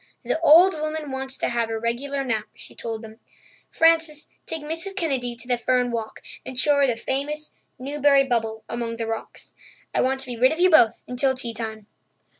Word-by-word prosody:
"The - - -1
old 335 +4 +7
woman 310 -2 -3
wants 265 0 -4
to - - -1
have 235 -1 -1
her 225 0 -2
regular 270 +5 -2
nap," 220 -5 -1
she - - -10
told 225 -1 -6
them. 220 0 -12 0.5
"Frances, 325 -2 +2 0.2
take 320 -2 -4
Mrs. 330 +6 -3
Kennedy 265 -9 -1
to 235 +1 -9
the 245 -1 0
fern 250 0 +1
walk 225 -2 -5 0.2
and 260 - -7
show 290 +3 +4
her 280 -1 +4
the 245 - +1
famous 295 +5 -3 0.2
'Newbury 280 +1 +3
Bubble' 225 -4 -2
among 235 -1 -3
the 230 - -3
rocks. 225 0 -6 0.4
I - - +2
want 265 +1 +1
to - - -8
be 245 -2 -6
rid 255 +2 +5
of 320 - -3
you 365 +1 +5
both 235 -8 +5
until 260 +2 +1
tea 240 -3 -2
time." 220 -1 -6
260 Hz, 200 wpm, -24 LUFS, 235-295 Hz, 0.5 s, old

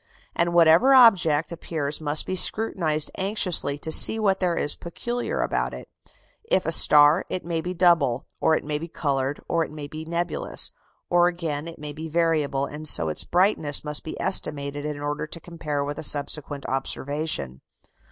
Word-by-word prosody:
And 170 0 0
whatever 170 +11 +5
object 175 - +4
appears 155 -3 -4
must 150 0 +3
be 185 - -3
scrutinized 175 -7 +1
anxiously 190 -7 0
to 160 +2 -4
see 220 - +6
what 195 -3 0
there 180 -2 0
is 145 - +4
peculiar 240 - -4
about - - -2
it. - - -11 0.6
If 190 - 0
a 165 - -1
star, 150 +1 +5
it 185 - -5
may 165 -1 -3
be 180 +2 -6
double, 165 -9 +2
or 160 - +2
it - - -7
may 150 0 -3
be 165 - -7
coloured, 140 -3 -3
or 165 -1 0
it - - -7
may 150 -1 -8
be 155 +2 -8
nebulous; 170 +1 -2 0.4
or 175 0 +4
again 165 -4 -4
it 165 - -10
may 150 -1 -7
be 160 +2 -8
variable, 155 -4 0
and 150 +2 -8
so 80 - +3
its 75 - -2
brightness 175 -6 +1
must 150 -1 -1
be 160 - -8
estimated 145 -6 -1
in 150 -1 -5
order 145 +1 -4
to 170 - -8
compare 155 -4 -5
with 145 +1 -5
a - - -6
subsequent 145 -1 0
observation. 135 - -3
155 Hz, 180 wpm, -24 LUFS, 145-175 Hz, 0.6 s, see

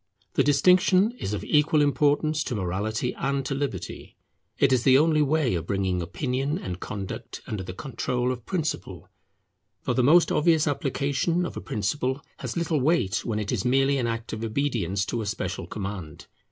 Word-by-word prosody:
The - - +3
distinction 185 +7 +4
is 95 - -3
of 105 - -3
equal 150 +1 +3
importance 150 +1 +2
to 125 - -2
morality 105 +6 -2
and 135 0 -1
to - - -2
liberty. 140 0 -5 0.4
It 135 -1 +4
is 125 - +3
the 130 +1 +6
only 155 +1 +3
way 150 -4 +2
of 85 -1 -3
bringing 95 -2 0
opinion 130 - -2
and 90 - -5
conduct 100 -2 -6
under 105 -3 -4
the 90 0 -7
control 125 -1 -2
of 125 -2 -5
principle; 155 - -3 0.7
for - - 0
the 130 - +2
most 160 +7 +5
obvious 160 0 +3
application 145 +4 0
of - - -6
a - - -5
principle 130 +6 -1 0.2
has - - -5
little 165 -4 0
weight 125 - +1
when 110 -3 -1
it 105 -2 -2
is - - -1
merely 135 +2 +2
an 120 - 0
act 115 0 -4
of 110 +1 -4
obedience 110 -6 -1
to 120 - -2
a 105 - -4
special 100 - -3
command. 95 -6 -6
130 Hz, 180 wpm, -26 LUFS, 105-150 Hz, 0.7 s, the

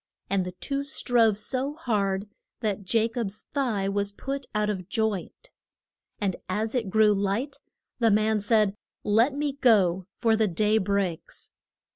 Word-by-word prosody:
And 195 -1 +2
the 180 - -6
two 275 +9 -3
strove 245 -7 +2
so 260 +6 -2
hard 205 -9 -1 0.3
that 200 -4 -2
Ja 225 -1 +4
cob's 225 -3 -4
thigh 230 -9 0
was 200 0 -1
put 275 +6 -5
out 210 0 +1
of 190 -3 -3
joint. 220 - -2 0.7
And 195 -4 -1
as 215 +4 -1
it 235 -6 -1
grew 215 +1 +4
light 205 +8 -1 0.4
the 230 -2 +4
man 215 0 +2
said, 210 -1 +3 0.3
Let 230 +7 +3
me 290 -1 -1
go, 190 -8 +3
for 225 -1 +2
the 220 -1 +2
day 210 +4 +2
breaks. 195 -4 -2
215 Hz, 150 wpm, -26 LUFS, 200-235 Hz, 0.7 s, Ja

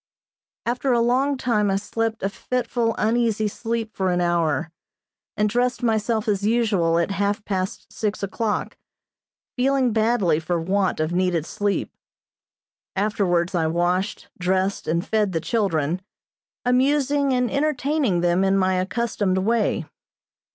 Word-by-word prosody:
After 250 +3 0
a 240 - +3
long 260 +4 +2
time 215 -5 +1
I 195 - +1
slept 225 +2 -2
a 195 - +1
fitful, 235 +1 -1
uneasy 220 -1 +1
sleep 225 +1 -3
for 190 -1 0
an 180 0 +1
hour, 170 -2 0 0.7
and 210 0 +3
dressed 245 +3 0
myself 220 -1 +1
as 200 -2 0
usual 205 -7 +2
at 170 +3 +1
half 205 +2 -1
past 190 -2 -3
six 210 -2 -2
o'clock, 210 +2 -2 0.8
feeling 260 -2 +2
badly 215 -8 +2
for 170 +2 -1
want 190 +2 0
of 155 +1 0
needed 180 -3 +1
sleep. 205 +2 -2 1.0
Afterwards 190 -3 +1
I 165 -3 +1
washed, 175 +4 -1
dressed 190 +2 0
and 170 +4 0
fed 210 -3 +1
the 165 - +1
children, 170 -4 0 0.6
amusing 280 +2 +2
and 250 -1 +1
entertaining 280 - +1
them 175 +2 +2
in 195 0 +3
my 185 -1 +2
accustomed 195 -1 -1
way. 220 +4 +1
205 Hz, 135 wpm, -23 LUFS, 185-235 Hz, 1.0 s, a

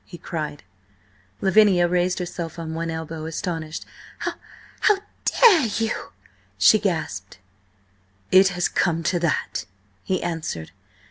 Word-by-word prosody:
he 175 - -11
cried. 150 -4 -5 0.8
Lavinia 190 -3 +5
raised 180 +1 +1
herself 175 -2 -5
on 160 -1 -5
one 165 +1 -3
elbow, 160 -1 -5
astonished. 165 -1 -4 0.4
"H - - -1 0.5
how 420 -2 +4 0.3
dare 360 - +6
you?" 225 -1 -2 0.5
she 215 - +6
gasped. 155 - -3 0.9
"It 190 +1 +7
has 180 -2 0
come 165 -2 0
to 175 +1 +1
that!" 160 -8 -1 0.4
he 185 -1 -1
answered. 155 - -4
170 Hz, 120 wpm, -23 LUFS, 160-185 Hz, 0.9 s, It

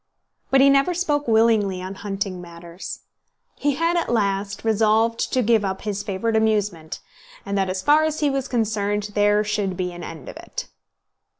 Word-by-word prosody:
But 270 0 +5
he 275 - +7
never 275 +6 +3
spoke 295 -5 0
willingly 220 -4 +3
on 185 +1 -6
hunting 195 -2 -4
matters. 170 +1 -9 0.6
He 290 -1 +1
had 335 +3 +1
at 340 - 0
last 200 -3 -1
resolved 225 +1 +2
to 255 - +2
give 225 -1 +3
up 190 -1 -3
his 205 -1 -2
favourite 210 +4 -2
amusement, 210 -7 0 0.4
and 200 -1 -3
that 195 -1 +1
as 185 0 -3
far 300 +2 +5
as 315 0 -1
he 295 - +2
was 270 -1 -2
concerned 210 -3 -1
there 205 0 +3
should 205 -3 -2
be 180 -1 -2
an 175 0 -8
end 160 -5 -9
of - - -8
it. - - -7
210 Hz, 180 wpm, -23 LUFS, 195-235 Hz, 0.6 s, he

